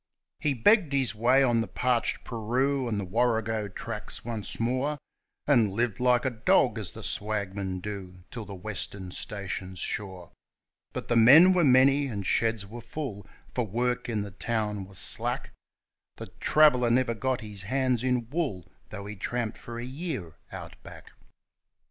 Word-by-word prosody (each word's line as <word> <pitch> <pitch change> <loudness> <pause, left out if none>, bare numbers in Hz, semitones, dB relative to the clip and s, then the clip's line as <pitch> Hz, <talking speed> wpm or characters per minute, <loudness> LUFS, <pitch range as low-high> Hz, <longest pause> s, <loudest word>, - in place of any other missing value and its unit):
He 145 -2 0
begged 170 - +4
his 135 -4 +1
way 125 +5 +4
on 120 -3 +3
the 115 - -3
parched 125 -2 0
Paroo 125 +4 0
and 105 -2 -1
the 100 - -3
Warrego 110 0 0
tracks 100 - -7
once 115 -3 -5
more, 130 +6 0 0.5
And 120 -8 +4
lived 115 +1 0
like 125 0 +3
a 130 - +1
dog, 110 -2 +3
as - - -6
the - - -9
swagmen 100 -3 -3
do, 95 -3 -7
till 115 - -6
the 100 -1 -8
Western 95 -1 -5
stations 95 -1 -5
shore; 95 -2 -4 0.6
But 120 - -2
men 145 +11 +8
were 180 -2 +3
many, 135 +1 +5
and 100 -6 -4
sheds 110 +1 +1
were 115 +4 -9
full, 115 - -6 0.3
for 120 -3 -1
work 125 +4 -1
in 110 -3 -1
the 100 0 -6
town 105 -1 -2
was 95 0 -7
slack - - -1 0.6
The - - -8
traveller 125 -6 +5
never 120 0 +2
got 130 +2 -1
hands 115 +4 -1
in 125 -3 0
wool, 115 - -2 0.2
though 100 -1 -7
he 105 +1 -6
tramped 115 +3 -3
for 115 0 -8
a 120 - -4
year 130 - -5 0.2
Out - - -9
Back. - - -12
115 Hz, 160 wpm, -28 LUFS, 100-130 Hz, 0.6 s, men